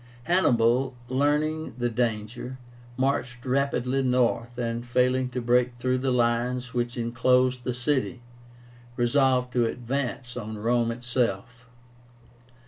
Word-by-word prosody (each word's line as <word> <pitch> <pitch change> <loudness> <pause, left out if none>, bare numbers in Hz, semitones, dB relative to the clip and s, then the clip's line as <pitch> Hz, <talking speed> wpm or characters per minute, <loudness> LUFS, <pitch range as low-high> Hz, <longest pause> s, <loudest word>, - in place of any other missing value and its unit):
Hannibal, 125 -6 +2
learning 150 +3 0
the 120 -1 0
danger, 115 +2 -2 0.4
marched 130 -2 -1
rapidly 135 0 0
north, 125 -2 +1
and 115 -1 -2
failing 125 +1 +1
to 125 0 -3
break 120 +1 +2
through 130 +1 0
the 135 +1 0
lines 125 +1 0
which 120 0 -2
enclosed 125 +2 +2
the 125 - -2
city, 125 -1 -1 0.7
resolved 125 0 +2
to 120 -2 +3
advance 125 +1 -3
on 110 -2 -5
Rome 115 +2 +1
itself. 120 0 -2
125 Hz, 115 wpm, -26 LUFS, 120-130 Hz, 0.7 s, to